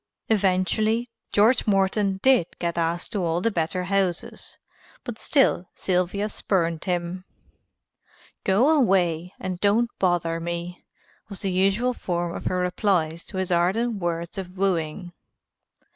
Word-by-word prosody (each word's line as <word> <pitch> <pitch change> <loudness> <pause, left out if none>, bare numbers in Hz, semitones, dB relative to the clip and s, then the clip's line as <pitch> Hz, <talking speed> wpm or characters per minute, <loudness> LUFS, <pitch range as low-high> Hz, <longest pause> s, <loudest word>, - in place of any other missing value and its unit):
Eventually, 215 +3 +1 0.2
George 220 +4 +4
Morton 195 0 +2
did 260 -10 +5
get 170 -1 -2
asked 170 +1 -1
to 205 -5 -1
all 165 0 0
the 230 +5 0
better 180 0 -1
houses, 190 -2 -2 0.5
but 235 -3 -6
still 265 - +2
Sylvia 185 +3 0
spurned 170 -6 -1
him. 180 0 -2 1.2
"Go 240 +12 +4
away 180 - +1
and 185 -1 -4
don't 225 +4 +2
bother 175 -3 +1
me," 170 +1 -5 0.5
was 200 - -8
the 195 - -1
usual 195 +7 +2
form 175 -6 -3
of - - -7
her 185 - 0
replies 180 -3 0
to 190 - -7
his 185 -1 -2
ardent 200 +6 +1
words 170 +2 -3
of 185 0 -8
wooing. 175 -2 -1
185 Hz, 130 wpm, -24 LUFS, 175-205 Hz, 1.2 s, did